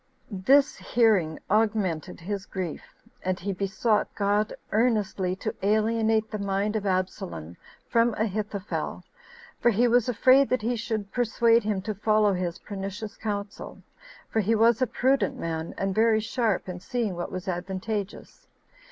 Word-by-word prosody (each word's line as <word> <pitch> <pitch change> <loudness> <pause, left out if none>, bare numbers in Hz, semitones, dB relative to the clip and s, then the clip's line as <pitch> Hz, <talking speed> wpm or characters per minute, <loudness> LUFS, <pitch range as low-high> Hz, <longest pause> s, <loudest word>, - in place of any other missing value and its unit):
This 265 +9 +3
hearing 205 -10 +2
augmented 210 -7 0
his 195 +2 -4
grief; 180 -5 -4 0.4
and 185 0 -1
he 200 +2 -3
besought 205 +3 0
God 205 +1 +1 0.2
earnestly 210 -5 +1
to 215 +3 -4
alienate 220 +1 +2
the 215 - -3
mind 200 +2 -1
of 205 -2 -1
Absalom 85 - -3 0.3
from 230 -1 +2
Ahithophel, 210 -1 -3 0.6
for 240 - +4
he 235 +2 +3
was 240 0 +3
afraid 260 +3 +5
that 255 -3 0
he 240 +2 0
should 215 -3 -3
persuade 235 0 +3
him 205 -3 -1
to 215 +1 -2
follow 210 0 +2
his 180 -1 -2
pernicious 200 +2 -6
counsel, 205 -2 -5 0.4
for 225 - -1
he 220 +2 +2
was 230 +2 +4
a 255 - +3
prudent 255 -3 +1
man, 160 0 -4
and 195 0 -1
very 220 +1 +4
sharp 220 -3 -1
in 180 -1 -5
seeing 235 -1 -2
what 175 - -4
was 185 +1 -6
advantageous. 195 - -4
210 Hz, 145 wpm, -26 LUFS, 190-225 Hz, 0.6 s, afraid